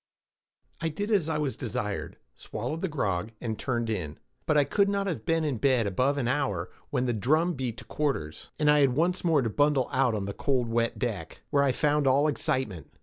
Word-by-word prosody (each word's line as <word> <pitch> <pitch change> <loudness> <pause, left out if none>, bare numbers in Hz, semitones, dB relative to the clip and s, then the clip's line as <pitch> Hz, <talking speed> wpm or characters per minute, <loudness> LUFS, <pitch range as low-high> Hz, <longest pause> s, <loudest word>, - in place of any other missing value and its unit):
I 165 - 0
did 205 +8 -3
as 185 -7 +2
I 155 - 0
was 150 -3 -1
desired, 115 -5 -4 0.2
swallowed 125 +9 -5
the 190 - 0
grog, 110 - -2
and 110 -2 -3
turned 120 -3 -1
in; 90 -9 -3 0.3
but 155 - +3
I 145 - +6
could 200 +7 +2
not 200 0 0
have 160 - -4
been 165 0 +2
in 145 -5 -1
bed 130 -4 +3
above 130 +9 +1
an 125 -4 0
hour, 100 -10 -1 0.2
when 125 -2 0
the 120 - +1
drum 155 - +2
beat 125 -5 -3
to - - -10
quarters, 135 - -3
and 150 - +1
I 150 0 +6
had 135 -3 +4
once 175 +4 +1
more 160 -6 +3
to 115 - 0
bundle 145 -1 +2
out 130 -3 +2
on 100 -2 -2
the 100 - -4
cold 125 0 0
wet 115 0 0
deck, 105 -10 -4
where 145 -2 +4
I 140 -1 +3
found 150 +1 +1
all 140 +3 +4
excitement. 110 - -2
135 Hz, 215 wpm, -28 LUFS, 115-150 Hz, 0.3 s, I